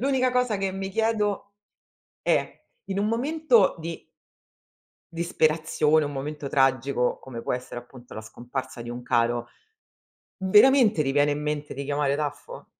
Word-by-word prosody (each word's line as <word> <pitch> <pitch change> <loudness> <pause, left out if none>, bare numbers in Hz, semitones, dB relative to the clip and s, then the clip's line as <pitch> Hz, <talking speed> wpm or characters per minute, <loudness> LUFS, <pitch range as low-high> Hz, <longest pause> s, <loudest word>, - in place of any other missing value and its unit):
L'unica 255 -1 +1
cosa 250 -4 +1
che 195 -1 -2
mi 195 0 -4
chiedo 210 -2 -1 0.7
è: - - 0 0.2
in 195 0 -3
un 205 - +1
momento 250 - +2
di 165 0 -6 1.1
disperazione, 155 -2 +1
un 145 - -4
momento 145 +1 -5
tragico, 135 -2 +1
come 120 -3 -8
può - - -2
essere 125 -1 -5
appunto 120 0 -14
la - - -5
scomparsa 125 +3 -7
di 120 0 -6
un 120 +1 -6
caro, 120 0 0 0.9
veramente 210 - +5
ti 135 - 0
viene 145 +1 +3
in 145 +1 -2
mente 150 0 -3
di 140 - -5
chiamare 145 0 0
Taffo? 150 - -5
150 Hz, 145 wpm, -25 LUFS, 135-205 Hz, 1.1 s, veramente